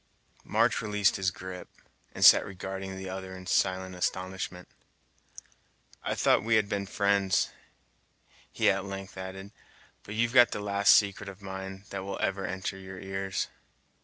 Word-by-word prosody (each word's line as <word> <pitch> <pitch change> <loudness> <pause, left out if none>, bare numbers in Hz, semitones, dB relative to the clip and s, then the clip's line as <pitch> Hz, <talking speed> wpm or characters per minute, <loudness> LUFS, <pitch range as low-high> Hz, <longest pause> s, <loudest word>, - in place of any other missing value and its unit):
March - - +2
released 105 -2 +2
his 95 -1 +1
grip, 90 0 -8 0.4
and - - +2
sat - - +9
regarding 95 0 -6
the 95 0 -6
other 95 0 -6
in 90 - -11
silent 95 0 +1
astonishment. 90 0 -3 1.3
"I - - -2
thought - - +3
we 115 0 +3
had 105 -2 +3
been 100 -1 -2
friends," 100 -1 +2 1.0
he - - +3
at 95 0 -1
length 95 0 -7
added; 95 +1 -7 0.5
"but 105 - -8
you've 120 +2 +1
got 120 -2 +7
the - - -3
last 100 -2 +5
secret 100 -1 +1
of 100 +1 -12
mine 95 0 -7
that 95 -1 -4
will 100 0 -4
ever 95 0 -1
enter 95 0 -4
your 95 -1 -9
ears." 95 0 -3
95 Hz, 155 wpm, -29 LUFS, 95-100 Hz, 1.3 s, sat